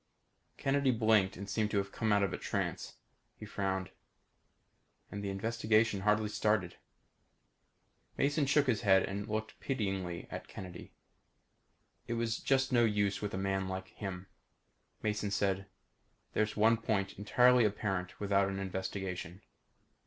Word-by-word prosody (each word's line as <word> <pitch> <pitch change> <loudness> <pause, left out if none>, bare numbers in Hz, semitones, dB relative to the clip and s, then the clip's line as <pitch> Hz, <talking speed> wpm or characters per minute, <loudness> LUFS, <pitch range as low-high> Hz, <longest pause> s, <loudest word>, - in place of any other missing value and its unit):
Kennedy 135 0 +2
blinked 110 -5 +3
and 100 - -6
seemed 105 +1 0
to 100 -2 +1
come 110 +3 -2
out 100 -1 +4
of 95 -2 0
a - - -2
trance. - - -3 0.4
He 110 - -8
frowned. 95 -2 -2 1.2
"And 100 0 -5
the 100 - -2
investigation 110 +1 +1
hardly 105 +2 +2
started." 105 -4 0 1.4
Mason 145 +1 +2
shook 145 +1 +4
his 120 -6 +1
head 95 -4 +5
and 100 +2 -4
looked 110 0 -4
pityingly 95 -9 -2
at - - -6
Kennedy. 90 -2 -9 1.2
It 120 - -2
was 115 -1 -1
just 135 0 +2
no 120 -2 +5
use 105 -3 +1
with 105 -2 -3
a - - -2
man 95 0 -1
like 95 0 -5
him. 95 -3 -6 0.8
Mason 105 -1 -1
said. 100 -1 0 0.7
"There's 110 0 0
one 110 +2 +5
point 100 -4 -1
entirely 125 +4 +5
apparent 95 -3 -1
without 100 -1 +2
an 95 - -3
investigation." 95 -1 -4
100 Hz, 140 wpm, -33 LUFS, 95-110 Hz, 1.4 s, head